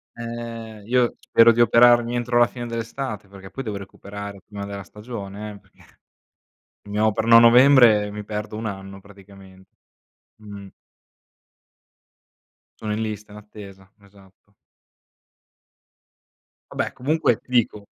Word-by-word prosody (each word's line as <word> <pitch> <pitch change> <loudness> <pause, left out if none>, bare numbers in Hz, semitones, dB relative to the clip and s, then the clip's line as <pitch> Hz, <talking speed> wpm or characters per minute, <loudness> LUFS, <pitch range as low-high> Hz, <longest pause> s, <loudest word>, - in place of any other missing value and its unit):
Ehm, 115 -2 -8
io 125 -1 +1
spero 115 0 +5
di 120 +1 +1
operarmi 120 +1 +5
entro 120 0 0
la 120 - +5
fine 120 -1 -8
dell'estate 115 -2 -5
perché 95 -1 -13
poi 135 - -6
devo 105 -3 -5
recuperare 100 0 -9
prima 100 -1 -8
della 100 -1 -7
stagione, 105 0 -8
eh, 100 - -12
perché 100 -1 -25 0.9
mi 105 +1 -4
operano 110 +2 +4
a - - +9
novembre 120 -3 +6
e - - -7
mi 105 0 -7
perdo 105 0 -6
1 110 0 -5
anno 95 -1 -8
praticamen 95 -1 -17 0.7
mh-mh. 100 -2 -11 2.1
Sono 105 -1 -3
in 110 - -3
lista 105 -1 -6
d'attesa, 100 -2 -13
esatto. 100 0 -23 2.2
Va - - -11
beh, - - -6
comunque, 140 -3 0
ti - - -33
dico 110 -4 0
105 Hz, 130 wpm, -22 LUFS, 100-115 Hz, 2.2 s, a